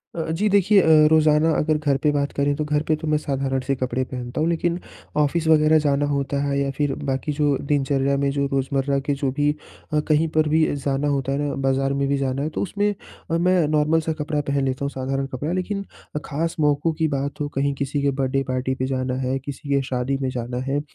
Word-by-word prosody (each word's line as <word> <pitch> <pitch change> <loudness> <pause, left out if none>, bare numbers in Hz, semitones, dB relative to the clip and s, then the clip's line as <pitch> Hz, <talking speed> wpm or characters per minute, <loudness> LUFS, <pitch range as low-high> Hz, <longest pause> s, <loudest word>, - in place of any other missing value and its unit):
अ 165 - -2
अ, 160 - -3
जी 200 +6 +1
देखिए 200 +1 +5
अ, - - 0 0.3
रोज़ाना 155 0 +4
अगर 155 0 +1
घर 145 -3 +1
पे 150 - +4
बात 145 -1 0
करें 145 0 +2
तो 155 - -2
घर 150 0 +1
पे 155 - +3
तो 155 +1 -6
मैं 150 0 +2
साधारण-से 135 -1 -1
कपड़े 130 0 -1
पहनता 125 +3 -5
हूँ 160 - +2
लेकिन 170 +1 0 0.4
ऑफिस 155 +2 +1
वग़ैरह 155 0 +5
जाना 145 -1 +1
होता 140 0 -1
है 140 0 0
या 140 0 0
फ़िर 145 -2 +1 0.2
बाक़ी 135 +3 -2
जो 145 -2 +1
दिनचर्या 140 -1 +1
में 140 - +2
जो 140 0 0
रोज़मर्रा 135 +1 0
के 145 - +2
जो 135 -2 +1
भी 145 0 +3 0.4
अ, 150 - +3
कहीं 155 +1 +2
पर 155 -1 +3
भी 160 +1 +4
जाना 140 +1 -1
होता 135 -2 0
है 140 - 0
ना 140 - -2
बाज़ार 135 +1 +1
में 140 - +1
भी 140 0 +1
जाना 135 0 -1
है 155 - -1
तो - - -4
उसमें 205 +2 0 0.4
अ, 165 - +2
मैं 180 -2 +3
नॉर्मल 155 +1 +2
सा 160 0 -2
कपड़ा 150 0 -1
पहन 140 -1 +1
लेता 130 +1 -2
हूँ - - -1
साधारण 135 +1 -2
कपड़ा। 140 +5 -4
लेकिन 200 +2 -2 0.4
ख़ास 165 +3 -2
मौकों 150 +2 +2
की 160 0 0
बात 140 0 -3
हो, 145 - 0
कहीं 140 0 0
किसी 140 +1 -2
के 140 0 +2
बर्थडे 135 0 0
पार्टी 130 +1 -1
पे 130 - -2
जाना 130 -1 -1
है 130 +1 0
किसी 140 +2 -8
के 140 - +3
शादी 130 +1 -2
में 130 - 0
जाना 125 -1 -4
है, 145 +2 0
140 Hz, 235 wpm, -23 LUFS, 135-155 Hz, 0.4 s, देखिए